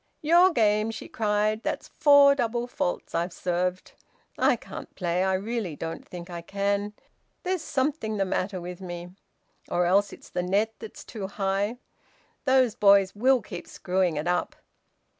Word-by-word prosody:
"Your 345 +4 +6
game!" 215 - +2
she 225 - -7
cried. 215 0 0
"That's - - -3
four 285 -2 +6
double 240 -3 -1
faults 180 -7 -3
I've 170 +2 -1
served. 180 +1 -2 0.4
I - - +3
can't - - -10
play! 180 0 0
I 190 0 +2
really 205 -4 -3
don't 165 +2 -6
think 175 -1 -8
I 175 -2 -6
can. 200 +3 -1 0.5
There's 370 -2 -1
something 265 -7 -1
the 195 - +1
matter 190 0 -2
with 180 +1 -8
me! 175 -1 -6 0.6
Or 175 0 +1
else 200 +3 +3
it's - - -13
the - - -1
net 200 +5 +1
that's 220 - -9
too 210 -5 -6
high. 200 +3 -1 0.7
Those 260 -4 +4
boys 200 -2 +5
will 255 +2 +3
keep 175 -2 -8
screwing 180 -2 0
it 150 - -2
up!" 180 0 0
200 Hz, 160 wpm, -26 LUFS, 180-230 Hz, 0.7 s, Your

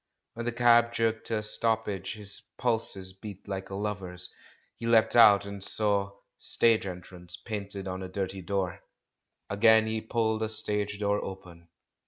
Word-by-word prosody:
When 115 +1 -5
the - - +1
cab 120 0 +4
jerked 115 -1 0
to 115 - 0
a 105 - -3
stoppage, 105 -3 -1
his 105 -1 -5 0.2
pulses 110 -6 -1
beat 100 0 -10
like 95 -1 -5
a 95 - -5
lover's. 95 -4 -4 0.4
He 115 - -5
leapt 115 -1 +4
out, 105 -4 +7
and 100 -1 -6
saw 100 -2 +1 0.2
"Stage 115 -4 +2
Entrance" 90 -1 -8
painted 100 -3 -6
on 95 0 -4
a 95 - -6
dirty 95 0 -4
door. 95 -1 -2 0.7
Again 110 +2 +5
he 110 0 -2
pulled 110 -1 0
a 110 - -1
stage 105 -2 -1
door 100 0 0
open. 90 -3 -9
105 Hz, 160 wpm, -29 LUFS, 95-110 Hz, 0.7 s, out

